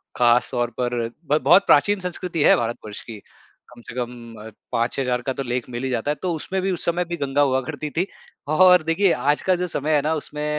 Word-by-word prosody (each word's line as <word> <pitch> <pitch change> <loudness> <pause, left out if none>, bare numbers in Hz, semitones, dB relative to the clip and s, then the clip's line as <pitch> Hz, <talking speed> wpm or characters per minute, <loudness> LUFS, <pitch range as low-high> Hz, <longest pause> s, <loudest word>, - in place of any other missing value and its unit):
खास 120 0 +3
तौर 120 -1 -1
पर 120 -2 -1 0.2
ब 150 - +4
बहुत 175 +8 +6
प्राचीन 205 +8 +4
संस्कृति 180 -3 -3
है - - +6
भारतवर्ष 115 -3 -4
की, 115 -2 -9 0.5
कम 120 -1 -15
से 115 - -11
कम 120 -2 -6
अ, - - -8 0.2
5-6 120 +3 -1
हज़ार 125 -1 -1
का 130 +1 -3
तो 135 - -4
लेख 125 0 -3
मिल 120 +1 -5
ही 130 - -1
जाता 125 +3 -1
है। - - -1
तो 180 -2 -1
उसमें 190 +4 -3
भी 190 +1 0
उस 175 - -2
समय 175 +1 0
भी 175 0 -5
गंगा 140 0 0
हुआ 130 -2 +2
करती 150 0 -5
थी, 175 +6 -1 0.4
और 180 +2 +5
देखिए 170 +4 +2
आज 145 +4 0
का 185 - +2
जो 180 0 -2
समय 150 +2 0
है 145 - +3
ना, 155 +2 0
उसमें 150 0 -6
145 Hz, 240 wpm, -22 LUFS, 120-170 Hz, 0.5 s, बहुत